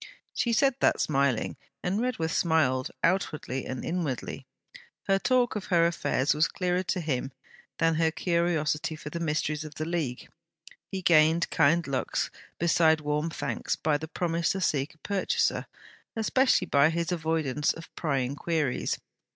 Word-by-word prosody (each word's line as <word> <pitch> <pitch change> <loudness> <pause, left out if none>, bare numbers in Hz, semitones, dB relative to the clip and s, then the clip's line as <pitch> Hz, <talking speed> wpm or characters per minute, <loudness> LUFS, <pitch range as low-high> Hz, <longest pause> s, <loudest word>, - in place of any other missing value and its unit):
She 235 - 0
said 270 +4 +3
that - - +3
smiling; 135 -4 +1 0.3
and 195 +5 0
Redworth 220 -11 -1
smiled, 135 -6 +2
outwardly 155 -7 0
and 130 -1 -5
inwardly. 165 -8 -3 0.6
Her 195 0 +2
talk 250 +1 +2
of 210 - -3
her 170 -2 +3
affairs 165 -5 +1
was 150 +2 +3
clearer 180 -1 -1
to 185 0 -2
him 135 -4 -2 0.5
than 165 0 +3
her 160 0 +2
curiosity 165 -2 0
for 150 -1 -8
the 170 - -4
mysteries 155 -1 -1
of 155 -1 -9
the 155 - -3
League. 160 -7 -3 0.6
He 190 -1 -4
gained 160 0 +4
kind 165 +4 +3
looks 135 -2 -1 0.3
besides 160 -2 +3
warm 150 +2 0
thanks - - -2
by 150 -2 0
the 160 - -6
promise 170 0 0
to 190 - -3
seek 145 -4 0
a 160 - -13
purchaser; 200 -2 0 0.5
especially 255 +4 +2
by 140 +2 +4
his 170 +1 -1
avoidance 160 -4 0
of 165 - -11
prying 135 -4 -1
queries. 155 -4 -1
160 Hz, 150 wpm, -28 LUFS, 150-175 Hz, 0.6 s, gained